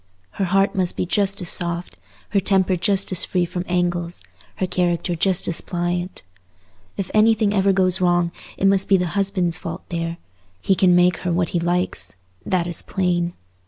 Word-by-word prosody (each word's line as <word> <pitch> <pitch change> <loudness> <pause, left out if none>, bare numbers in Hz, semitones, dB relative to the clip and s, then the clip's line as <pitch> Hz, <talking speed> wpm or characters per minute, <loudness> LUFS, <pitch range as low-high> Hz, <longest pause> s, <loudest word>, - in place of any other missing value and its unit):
Her 195 - -2
heart 195 +2 +2
must 185 -2 0
be - - -1
just 200 +2 0
as 175 - +1
soft, 170 0 0 0.3
her 200 - +2
temper 190 -1 +2
just 195 +3 +1
as 185 - +5
free 180 -2 0
from 175 +1 -4
angles, 175 -1 -2 0.3
her 185 - -1
character 175 -1 -1
just 185 +2 +1
as 170 - -2
pliant. 175 +1 -3 0.7
If 195 - -4
anything 215 -1 +3
ever 195 -1 +3
goes 185 -1 +2
wrong, 175 -1 +2 0.3
it - - -1
must 195 0 +2
be 195 - +5
the 180 - -1
husband's 190 -4 0
fault - - -6
there: 165 -1 -3 0.4
he 195 - +1
can 185 -1 +3
make 180 -1 +3
her 180 - -3
what 170 0 0
he 175 - -1
likes—that 170 - -2
is 175 -2 -1
plain. 175 -2 -1
180 Hz, 175 wpm, -21 LUFS, 175-195 Hz, 0.7 s, as